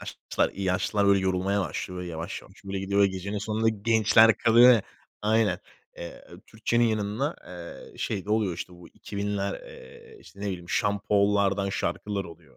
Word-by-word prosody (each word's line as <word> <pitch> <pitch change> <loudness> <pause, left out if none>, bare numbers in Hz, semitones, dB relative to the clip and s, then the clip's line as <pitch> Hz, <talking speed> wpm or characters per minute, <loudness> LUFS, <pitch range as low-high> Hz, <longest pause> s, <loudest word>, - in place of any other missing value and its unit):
yaşlılar, - - -2
yaşlılar, 100 +2 0
böyle, 100 0 +5
yorulmaya 95 +1 0
başlıyor 90 -1 -4
ve 90 - -6
yavaş, 85 0 -5
yavaş 100 +2 -19
böyle 95 0 -4
gidiyor 100 +1 0
ve - - +6
gecenin 100 +2 -4
sonunda 110 +2 0
gençler 110 +1 +4
kalıyor 120 +2 +7
ya 110 -4 +3 0.4
aynen. 105 -4 +2 0.4
Eee, 85 - -8 0.2
Türkçe'nin 120 +2 0
yanında 110 +7 -1 0.5
eee, - - -18
şey 100 -3 -2
de 105 - -6
oluyor, 105 -5 +1
işte, 90 - -7
bu 90 0 -14
2000'ler, 100 0 -4
eee, 470 -2 -14
işte, 100 - -16
ne - - -4
bileyim, 90 -3 -4
Sean 105 -2 +1
Paul'lardan 100 -1 +2
şarkılar 100 0 -2
oluyor. 80 -4 -14
100 Hz, 165 wpm, -27 LUFS, 95-110 Hz, 0.5 s, kalıyor